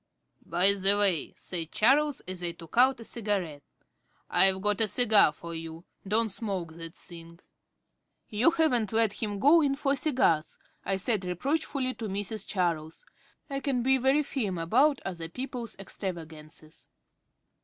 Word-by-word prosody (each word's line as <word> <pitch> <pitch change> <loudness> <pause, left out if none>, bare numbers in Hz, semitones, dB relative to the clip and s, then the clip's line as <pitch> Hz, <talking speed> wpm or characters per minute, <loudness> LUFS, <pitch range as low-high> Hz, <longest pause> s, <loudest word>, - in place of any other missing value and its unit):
"By 180 +4 +5
the 200 +1 +3
way," 195 -7 +2
said 165 -3 -4
Charles, 280 +5 +2
as 185 -1 -7
I 170 -1 -2
took 165 -2 -13
out 255 +2 +4
a 230 - -10
cigarette, 195 -11 -3 0.7
"I've 190 0 +4
got 210 +2 0
a 220 - +6
cigar 215 -6 +4
for 170 +2 -9
you. 165 +1 -8 0.2
Don't 220 +3 +1
smoke 190 -5 -5
that 165 0 -10
thing." 170 -1 -9 0.9
"You 220 +8 +3
haven't 305 - +1
let 225 -2 +2
him 205 -2 -2
go 295 +10 +5
in 280 -2 +1
for 280 0 0
cigars?" 255 - 0 0.3
I 195 - -1
said 200 +1 0
reproachfully 255 - -2
to 225 - -6
Mrs. 205 +2 -3
Charles. 165 -5 -2 0.4
I 275 -2 -4
can 265 -3 -1
be 265 +1 +3
very 270 +4 +2
firm 215 -10 -3
about 255 - +2
other 170 -4 -5
people's 250 +1 -6
extravagances. 160 -5 -9
205 Hz, 150 wpm, -28 LUFS, 170-255 Hz, 0.9 s, a